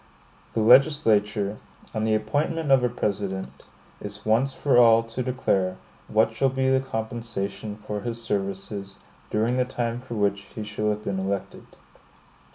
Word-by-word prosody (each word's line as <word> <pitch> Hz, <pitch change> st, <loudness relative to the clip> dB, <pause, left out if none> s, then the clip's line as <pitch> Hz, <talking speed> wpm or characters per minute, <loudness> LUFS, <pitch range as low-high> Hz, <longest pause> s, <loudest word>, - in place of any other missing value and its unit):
The 115 Hz, -, +1 dB
legislature, 110 Hz, -5 st, +4 dB, 0.3 s
on 110 Hz, 0 st, -1 dB
the 110 Hz, -1 st, +3 dB
appointment 145 Hz, +8 st, -1 dB
of 135 Hz, -2 st, +6 dB
a 125 Hz, -, +3 dB
President, 100 Hz, -4 st, -3 dB, 0.4 s
is -, -, -6 dB
once 115 Hz, +5 st, +3 dB
for 135 Hz, -2 st, +3 dB
all 115 Hz, -1 st, +6 dB
to 115 Hz, +2 st, -5 dB
declare 110 Hz, -7 st, 0 dB, 0.3 s
what 110 Hz, +1 st, +3 dB
shall 135 Hz, +4 st, +2 dB
be 130 Hz, 0 st, +1 dB
the 130 Hz, -, +4 dB
compensation 110 Hz, -4 st, -4 dB
for 105 Hz, -1 st, -5 dB
his 115 Hz, +1 st, -4 dB
services 100 Hz, -2 st, -4 dB, 0.3 s
during 115 Hz, +4 st, +1 dB
the 125 Hz, -, +3 dB
time 120 Hz, -2 st, -3 dB
for 125 Hz, -2 st, -7 dB
which 100 Hz, -1 st, +1 dB, 0.2 s
he 110 Hz, -, -4 dB
shall 105 Hz, 0 st, -2 dB
have 105 Hz, 0 st, -2 dB
been 100 Hz, -2 st, -2 dB
elected. 95 Hz, 0 st, -4 dB
110 Hz, 155 wpm, -25 LUFS, 105-125 Hz, 0.4 s, of